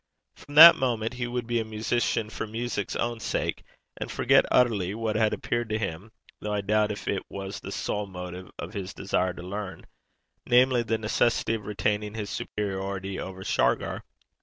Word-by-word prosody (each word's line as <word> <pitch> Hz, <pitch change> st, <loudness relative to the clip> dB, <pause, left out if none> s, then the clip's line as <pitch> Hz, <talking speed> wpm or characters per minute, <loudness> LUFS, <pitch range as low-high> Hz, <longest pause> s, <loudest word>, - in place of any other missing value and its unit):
From 145 Hz, -, -13 dB
that 165 Hz, +3 st, +12 dB
moment 115 Hz, -3 st, -1 dB
he 125 Hz, 0 st, -3 dB
would 120 Hz, 0 st, -3 dB
be 120 Hz, 0 st, 0 dB
a -, -, -1 dB
musician 110 Hz, 0 st, -1 dB
for 110 Hz, -, -4 dB
music's 110 Hz, -2 st, -3 dB
own 120 Hz, -1 st, -1 dB
sake, -, -, -2 dB, 0.3 s
and -, -, -5 dB
forgot -, -, +4 dB
utterly 105 Hz, -6 st, +2 dB
what 110 Hz, -1 st, -2 dB
had 110 Hz, -1 st, +3 dB
appeared 120 Hz, -1 st, -2 dB
to 110 Hz, -, 0 dB
him, 95 Hz, 0 st, -5 dB, 0.3 s
though 105 Hz, -, -4 dB
I 105 Hz, -1 st, 0 dB
doubt 105 Hz, +1 st, +2 dB
if 100 Hz, -, -7 dB
it 100 Hz, -, 0 dB
was, 100 Hz, +1 st, -6 dB
the 100 Hz, -, -8 dB
sole 105 Hz, +1 st, -2 dB
motive 90 Hz, -1 st, -8 dB
of -, -, -7 dB
his 100 Hz, -2 st, -5 dB
desire 95 Hz, -2 st, 0 dB
to 90 Hz, -, -9 dB
learn 100 Hz, +1 st, -6 dB, 0.6 s
namely, 125 Hz, 0 st, +5 dB
the 115 Hz, -1 st, -1 dB
necessity 110 Hz, +1 st, +1 dB
of 105 Hz, -3 st, -4 dB
retaining 105 Hz, 0 st, -1 dB
his 105 Hz, -2 st, -4 dB
superiority 95 Hz, -1 st, -3 dB
over 95 Hz, 0 st, -6 dB
Shargar. -, -, 0 dB
105 Hz, 180 wpm, -27 LUFS, 100-115 Hz, 0.6 s, that